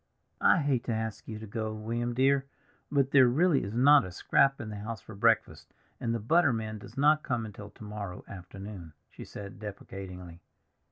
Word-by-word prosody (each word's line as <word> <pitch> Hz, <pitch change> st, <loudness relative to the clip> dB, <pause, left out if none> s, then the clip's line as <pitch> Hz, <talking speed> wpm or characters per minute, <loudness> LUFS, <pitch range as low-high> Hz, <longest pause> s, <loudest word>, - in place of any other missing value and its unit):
"I -, -, +6 dB
hate 135 Hz, -4 st, +1 dB
to -, -, -2 dB
ask 110 Hz, -2 st, -4 dB
you 110 Hz, -, -5 dB
to 110 Hz, -, -8 dB
go, 110 Hz, 0 st, -4 dB
William 115 Hz, +2 st, -3 dB
dear, 135 Hz, +1 st, +3 dB, 0.4 s
but 140 Hz, -2 st, +2 dB
there 130 Hz, -3 st, +7 dB
really 155 Hz, +5 st, +3 dB
is 100 Hz, +3 st, -5 dB
not 145 Hz, +4 st, +6 dB
a 95 Hz, -, -6 dB
scrap 135 Hz, +9 st, +2 dB
in 110 Hz, -, -6 dB
the 105 Hz, -, -6 dB
house 110 Hz, +2 st, -5 dB
for 110 Hz, -, -12 dB
breakfast, 115 Hz, +3 st, +1 dB, 0.2 s
and 115 Hz, -, -1 dB
the -, -, -2 dB
butter 160 Hz, +7 st, +3 dB
man 110 Hz, -2 st, -3 dB
does -, -, -13 dB
not 150 Hz, +2 st, +4 dB
come 120 Hz, -5 st, -2 dB
until 105 Hz, -1 st, -9 dB
to 105 Hz, -, -14 dB
morrow 105 Hz, -3 st, -7 dB
afternoon," 95 Hz, -2 st, -9 dB, 0.2 s
she -, -, -10 dB
said 100 Hz, -1 st, -9 dB
deprecatingly. 95 Hz, -4 st, -8 dB
110 Hz, 190 wpm, -29 LUFS, 100-130 Hz, 0.4 s, there